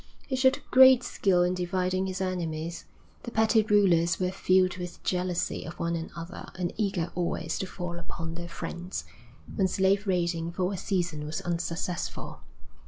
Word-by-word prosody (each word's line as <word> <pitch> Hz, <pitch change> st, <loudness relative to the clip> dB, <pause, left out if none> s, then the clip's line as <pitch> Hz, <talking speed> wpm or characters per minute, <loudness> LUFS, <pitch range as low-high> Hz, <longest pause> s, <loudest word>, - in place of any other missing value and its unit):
He 265 Hz, -, -2 dB
showed 260 Hz, 0 st, +3 dB
great 260 Hz, -1 st, +8 dB
skill 180 Hz, -3 st, +2 dB
in 180 Hz, +1 st, +1 dB
dividing 185 Hz, +1 st, 0 dB
his 190 Hz, 0 st, -4 dB
enemies. 170 Hz, -3 st, -3 dB, 0.4 s
The -, -, -6 dB
petty 220 Hz, 0 st, +4 dB
rulers 190 Hz, -5 st, +3 dB
were 180 Hz, -1 st, 0 dB
filled 185 Hz, -1 st, +2 dB
with 175 Hz, -1 st, -7 dB
jealousy 180 Hz, -1 st, -1 dB
of 165 Hz, -, -8 dB
one 170 Hz, 0 st, 0 dB
another 165 Hz, +1 st, -7 dB
and 180 Hz, -2 st, -2 dB
eager 190 Hz, -5 st, -1 dB
always 170 Hz, -2 st, -2 dB
to 190 Hz, -, -2 dB
fall 175 Hz, -2 st, -5 dB
upon 165 Hz, -1 st, -6 dB
their 170 Hz, 0 st, -6 dB
friends, 175 Hz, +2 st, -5 dB, 0.5 s
when 195 Hz, -3 st, +3 dB
slave 195 Hz, +2 st, +2 dB
raiding 170 Hz, -2 st, 0 dB
for 185 Hz, +2 st, 0 dB
a -, -, -3 dB
season 170 Hz, -5 st, -1 dB
was 155 Hz, +1 st, -4 dB
unsuccessful. 170 Hz, 0 st, -3 dB
180 Hz, 160 wpm, -28 LUFS, 170-190 Hz, 0.5 s, great